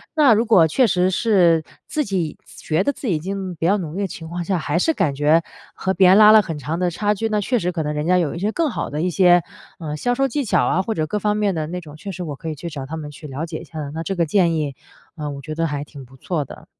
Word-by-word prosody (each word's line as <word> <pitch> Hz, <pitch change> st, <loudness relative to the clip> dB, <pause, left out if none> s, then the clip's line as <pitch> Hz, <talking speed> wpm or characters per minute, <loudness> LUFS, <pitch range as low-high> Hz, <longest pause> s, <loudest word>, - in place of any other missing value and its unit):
那 290 Hz, -6 st, +6 dB
如 220 Hz, +2 st, +2 dB
果 185 Hz, -8 st, +5 dB
确 255 Hz, -, +3 dB
实 180 Hz, -3 st, +2 dB
是 180 Hz, -6 st, +3 dB, 0.2 s
自 300 Hz, 0 st, -1 dB
己 180 Hz, -7 st, -2 dB
觉 160 Hz, +4 st, -2 dB
得 285 Hz, -, +1 dB
自 270 Hz, -, -7 dB
己 185 Hz, -, +2 dB
已 -, -, -1 dB
经 190 Hz, +1 st, -4 dB
比 165 Hz, -, -3 dB
较 195 Hz, +4 st, +3 dB
努 165 Hz, -6 st, -5 dB
力 200 Hz, -, -2 dB
的 200 Hz, -, 0 dB
情 165 Hz, -2 st, -9 dB
况 175 Hz, +1 st, -4 dB
下 185 Hz, +2 st, 0 dB
还 165 Hz, -, -1 dB
是 320 Hz, -, +2 dB
感 180 Hz, -, 0 dB
觉 150 Hz, +4 st, +3 dB, 0.3 s
和 190 Hz, -, -1 dB
别 190 Hz, -1 st, +5 dB
人 190 Hz, -, +7 dB
拉 215 Hz, 0 st, +8 dB
了 220 Hz, -, +8 dB
很 165 Hz, -6 st, -5 dB
长 150 Hz, +4 st, -3 dB
的 180 Hz, -1 st, +1 dB
差 205 Hz, +4 st, 0 dB
距， 225 Hz, +2 st, -2 dB
那 210 Hz, -1 st, +1 dB
确 245 Hz, +5 st, 0 dB
实 180 Hz, -2 st, -1 dB
可 170 Hz, -2 st, -3 dB
能 150 Hz, 0 st, -2 dB
人 150 Hz, 0 st, -2 dB
家 180 Hz, +1 st, +4 dB
有 170 Hz, -4 st, 0 dB
一 -, -, -5 dB
些 205 Hz, +4 st, 0 dB
更 325 Hz, +4 st, 0 dB
好 235 Hz, -, -4 dB
的 150 Hz, +1 st, -3 dB
一 180 Hz, -, +1 dB
些， 175 Hz, 0 st, +5 dB, 0.4 s
呃， 155 Hz, -3 st, -4 dB
销 245 Hz, +10 st, 0 dB
售 270 Hz, +1 st, +2 dB
技 280 Hz, +3 st, -2 dB
巧 -, -, +2 dB
啊 185 Hz, -, +2 dB
或 220 Hz, +4 st, -2 dB
者 155 Hz, -6 st, -1 dB
各 210 Hz, -, -2 dB
方 210 Hz, 0 st, 0 dB
面 205 Hz, -3 st, +1 dB
的 155 Hz, -1 st, -2 dB
那 180 Hz, +3 st, -4 dB
种 150 Hz, -3 st, -12 dB
确 195 Hz, +6 st, -7 dB
实 185 Hz, -, -7 dB
我 150 Hz, -4 st, -5 dB
可 160 Hz, +4 st, -6 dB
以 155 Hz, -, -4 dB
去 170 Hz, +4 st, -6 dB
找 140 Hz, -4 st, -6 dB
他 160 Hz, +4 st, -6 dB
们 150 Hz, -2 st, -6 dB
去 145 Hz, +1 st, -10 dB
了 140 Hz, +3 st, -4 dB
解 160 Hz, -1 st, -6 dB
一 -, -, -10 dB
下， 160 Hz, -, -9 dB
那 165 Hz, +1 st, -4 dB
这 195 Hz, -, -3 dB
个 170 Hz, -, +2 dB
建 170 Hz, 0 st, +2 dB
议， 150 Hz, -3 st, -2 dB, 0.4 s
呃， 150 Hz, -3 st, -4 dB
我 140 Hz, 0 st, -7 dB
觉 155 Hz, +2 st, -6 dB
得 165 Hz, +1 st, 0 dB
还 145 Hz, -1 st, -3 dB
挺 140 Hz, -2 st, -11 dB
不 130 Hz, +2 st, -18 dB
错 155 Hz, +2 st, -2 dB
的。 -, -, -12 dB
175 Hz, 330 characters per minute, -21 LUFS, 155-200 Hz, 0.4 s, 拉